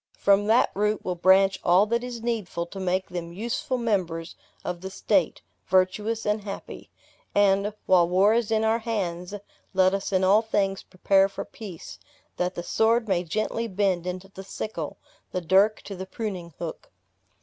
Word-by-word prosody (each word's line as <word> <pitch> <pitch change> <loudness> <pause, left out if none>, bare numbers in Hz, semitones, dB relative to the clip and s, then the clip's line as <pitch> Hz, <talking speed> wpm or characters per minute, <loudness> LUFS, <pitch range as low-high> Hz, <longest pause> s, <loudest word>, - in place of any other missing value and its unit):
From 200 +1 +3
that 225 +3 +4
root 210 +1 0
will 180 - 0
branch 190 +2 +4
all 180 +3 +5
that 235 +2 -1
is 240 -2 -6
needful 215 -7 -2
to 195 +3 -9
make 185 0 -1
them 170 -1 -5
useful 240 - -2
members 180 -8 -1 0.3
of 175 -1 -4
the 190 - -5
state 190 -3 0 0.2
virtuous 195 +5 +1
and 210 0 0
happy. 200 -1 -8 0.5
And, 200 0 +3
while 175 -2 +4
war 195 +4 +4
is 230 -1 +1
in 220 -1 +2
our 220 +1 +2
hands, 195 -5 -3 0.4
let 185 0 +4
us 195 0 -2
in 190 -1 +2
all 200 +3 +5
things 195 -3 0
prepare 195 +1 +2
for 195 - -6
peace, 195 -7 -10 0.4
that 180 +1 -1
the 175 - -4
sword 225 +4 +2
may 180 -3 +1
gently 215 +6 -2
bend 190 -3 0
into 185 +1 -5
the 195 0 -10
sickle, 190 -5 -5 0.3
the 185 - -1
dirk 195 +5 +3
to 200 - -7
the 190 +1 -7
pruning 185 -8 -5
hook." 170 -2 -7
195 Hz, 170 wpm, -26 LUFS, 180-215 Hz, 0.5 s, all